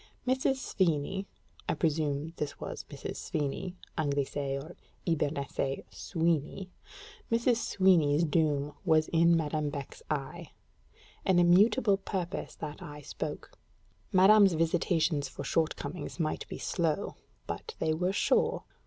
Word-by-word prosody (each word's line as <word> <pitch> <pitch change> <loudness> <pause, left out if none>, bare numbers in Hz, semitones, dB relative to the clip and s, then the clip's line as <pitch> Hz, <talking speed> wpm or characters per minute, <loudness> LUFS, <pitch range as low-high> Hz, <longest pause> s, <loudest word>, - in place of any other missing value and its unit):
Mrs. 260 +1 +2
Svini 190 - 0 0.4
(I - - +2
presume 155 -1 0
this 145 -1 -4
was - - -6
Mrs. - - -6
Svini, 150 +5 -3 0.2
Anglicé 140 -1 -1
or 155 +5 -10 0.3
Hibernicé 140 -4 -1
Sweeny) 170 +2 -1 0.6
Mrs. 235 +1 +3
Sweeny's 175 -9 +3
doom 150 -2 +1
was 160 -3 +3
in 170 0 +5
Madame 150 -1 -1
Beck's 140 -2 -7
eye 150 +2 -4 0.7
an 190 -2 +3
immutable 200 +5 +5
purpose 190 -2 -4
that 150 0 -7
eye 145 0 -8
spoke: - - -6 0.5
madame's 195 +1 +7
visitations 165 -3 +1
for 140 - -7
shortcomings 160 +2 -2
might 155 -2 -1
be - - -6
slow, 170 +2 -1 0.3
but 455 - -6
they 155 - +1
were 180 +4 0
sure. 200 - +2
165 Hz, 120 wpm, -30 LUFS, 145-185 Hz, 0.7 s, madame's